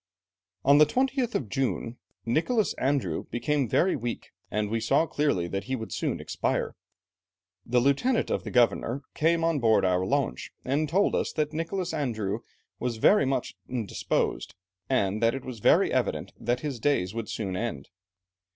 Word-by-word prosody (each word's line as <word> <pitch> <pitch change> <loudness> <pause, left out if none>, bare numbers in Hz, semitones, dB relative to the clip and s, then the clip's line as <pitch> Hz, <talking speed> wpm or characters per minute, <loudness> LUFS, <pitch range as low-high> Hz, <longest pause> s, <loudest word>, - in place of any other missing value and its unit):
"On 140 +2 +7
the 150 - +7
20th 260 -2 0
of 120 - -1
June 125 0 -2 0.3
Nicholas 185 - +1
Andrieu 140 +1 0
became 140 0 0
very 185 - +3
weak, 120 -2 -5 0.2
and 105 0 -1
we 115 - +1
saw 115 +8 +2
clearly 145 - 0
that 95 +2 -3
he 130 - -1
would 110 -3 -6
soon - - -1
expire. - - -2 0.9
The 125 +1 +3
lieutenant 140 - +2
of - - -1
the - - -5
governor 125 +2 +2
came 165 +1 +2
on 165 -3 +2
board 110 -5 +4
our 90 0 +2
launch, 140 +7 -1
and 145 +4 0
told 195 +6 +2
us - - 0
that 155 -1 -1
Nicholas 170 +2 -2
Andrieu 110 -9 -2 0.4
was 120 -2 -2
very 170 - +5
much 135 -2 -1 0.2
indisposed, 120 -6 -2 0.3
and 105 -5 +1
that 115 +2 +3
it 135 - -6
was 125 -3 -7
very - - +4
evident - - -1
that 120 +1 -1
his 140 -5 -4
days 110 -8 +1
would 115 -1 -4
soon 95 -4 -3
end. 95 - -4
130 Hz, 165 wpm, -27 LUFS, 115-150 Hz, 0.9 s, On